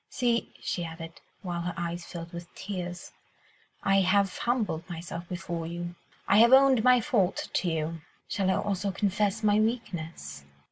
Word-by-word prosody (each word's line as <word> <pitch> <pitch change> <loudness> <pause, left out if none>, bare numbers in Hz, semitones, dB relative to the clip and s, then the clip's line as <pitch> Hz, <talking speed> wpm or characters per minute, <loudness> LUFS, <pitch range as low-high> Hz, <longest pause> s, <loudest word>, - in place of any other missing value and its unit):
See," 235 -2 0
she 175 - -2
added, 165 0 -8 0.2
while 175 -2 -3
her 175 0 -3
eyes 170 0 -3
filled 170 -1 -8
with 170 0 -8
tears, 180 -3 -5 0.7
"I 195 0 +4
have 195 +1 +3
humbled 210 -9 -1
myself 170 0 -6
before 170 -2 -4
you, 175 +1 -5 0.3
I 195 - +5
have 235 +3 +7
owned 265 -3 +7
my 250 0 +6
fault 220 -8 +1
to 180 - +1
you; 160 0 -2 0.3
shall 195 -2 0
I 190 - +3
also 200 0 -1
confess 205 +2 0
my 210 0 +4
weakness? 170 - -3
180 Hz, 155 wpm, -28 LUFS, 170-210 Hz, 0.7 s, have